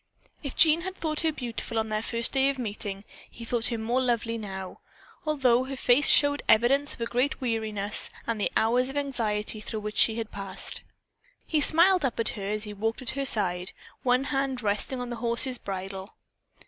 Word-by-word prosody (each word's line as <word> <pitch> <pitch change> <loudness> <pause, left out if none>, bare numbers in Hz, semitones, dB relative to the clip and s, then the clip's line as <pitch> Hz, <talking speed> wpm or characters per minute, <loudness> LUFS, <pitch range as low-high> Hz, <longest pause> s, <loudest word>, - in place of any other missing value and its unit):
If 280 -4 -6
Jean 320 0 +5
had 375 +2 -6
thought 310 -4 -2
her 320 - +1
beautiful 235 -4 -5
on 220 0 -1
the - - -4
day 230 +1 -4
of 235 - +5
their 270 0 +3
first 275 - -2
meeting, 205 -3 -5 0.2
he 230 - -11
thought 235 0 +2
her 235 - -1
more 235 +4 -1
lovely 235 -2 -1
now, 190 -4 -7 0.5
although 260 -5 +2
her 270 +1 -6
face 255 +2 +5
showed 285 0 +5
evidence 270 +6 +3
of - - -15
a - - 0
great 250 +5 -1
weariness 220 -5 0 0.2
and 225 -2 -3
the - - 0
hours 245 +3 +2
of 275 - -5
anxiety 225 -7 -2
through 215 0 -5
which 210 0 -6
she 220 - +4
had 225 -1 -5
passed. 195 -1 -2 0.6
He 310 -2 0
smiled 350 +4 +5
up 255 -4 -2
at 230 - 0
her 200 -2 -6
as 210 +1 -2
he 210 -1 -7
walked 225 +5 -3
at 240 - +2
her 275 0 -3
side, 185 -5 +3 0.3
one 250 +1 +2
hand 270 -3 -2
resting 210 +5 -2
on 245 0 -5
the 240 - -5
horse's 240 +2 +2
bridle. 195 +1 -7
235 Hz, 200 wpm, -26 LUFS, 215-270 Hz, 0.6 s, Jean